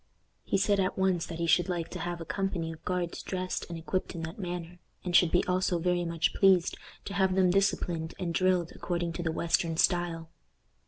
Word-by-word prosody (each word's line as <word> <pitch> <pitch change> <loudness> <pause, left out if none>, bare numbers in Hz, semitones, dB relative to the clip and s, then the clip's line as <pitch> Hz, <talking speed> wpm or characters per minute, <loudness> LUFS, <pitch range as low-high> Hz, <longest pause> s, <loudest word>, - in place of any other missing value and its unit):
He - - 0
said 200 +1 +2
at 185 0 0
once 190 -3 +1
that 165 - -6
he 170 - -1
should 175 +2 +3
like 175 -2 -2
to - - -6
have 175 0 -3
a 165 - -6
company 180 -3 -2
of 160 0 -11
guards 180 -2 -2
dressed 185 -1 -3
and 170 - -5
equipped 180 +3 -3
in 165 - -5
that 160 +5 -6
manner, 175 -1 -5 0.2
and 180 -1 -1
should 175 - +6
be 175 - +2
also 180 -1 +1
very 175 +1 0
much 165 -1 0
pleased 190 -3 +4 0.3
to 200 - -5
have 190 -2 +2
them 185 -2 +4
disciplined 175 -4 0
and 175 -3 -3
drilled 180 -1 +2
according 175 -1 -2
to 175 - -4
the 165 -2 -1
western 165 0 0
style. 170 -2 +1
175 Hz, 210 wpm, -29 LUFS, 165-185 Hz, 0.3 s, should